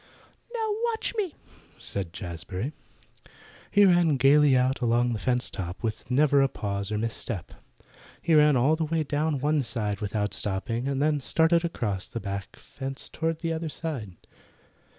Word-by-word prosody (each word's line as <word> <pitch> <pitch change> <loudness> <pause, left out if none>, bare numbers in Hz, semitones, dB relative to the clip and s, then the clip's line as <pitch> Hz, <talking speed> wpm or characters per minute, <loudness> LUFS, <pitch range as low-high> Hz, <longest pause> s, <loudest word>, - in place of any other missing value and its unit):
"Now 445 -2 -1 0.2
watch 460 0 -1
me!" 390 -8 -2 0.4
said 95 -4 -4
Jazbury. 90 - -5 1.0
He 205 0 +6
ran 175 -5 +4
gaily 140 +1 +5
out 130 +1 +1
along 120 0 +2
the 110 - -3
fence 125 +1 0
top 90 +1 -6
with 115 +1 -3
never 140 +2 +4
a 135 - +4
pause 100 -3 -3
or 105 - 0
mis 115 +1 -1
step. 100 -9 -5 0.7
He 165 - +1
ran 150 -2 +6
all 140 +6 +4
the 160 - -1
way 160 0 0
down 150 0 0
one 150 +2 +2
side 110 -5 -2
without 105 0 -1
stopping, 115 +5 -2
and 140 -1 -1
then 150 -1 +2
started 165 +6 +3
across 110 - -2
the 115 - -5
back 100 -2 -5
fence 135 0 -7
toward 165 0 -2
the 165 -1 -1
other 160 0 -3
side. 135 - -5
130 Hz, 165 wpm, -27 LUFS, 105-155 Hz, 1.0 s, He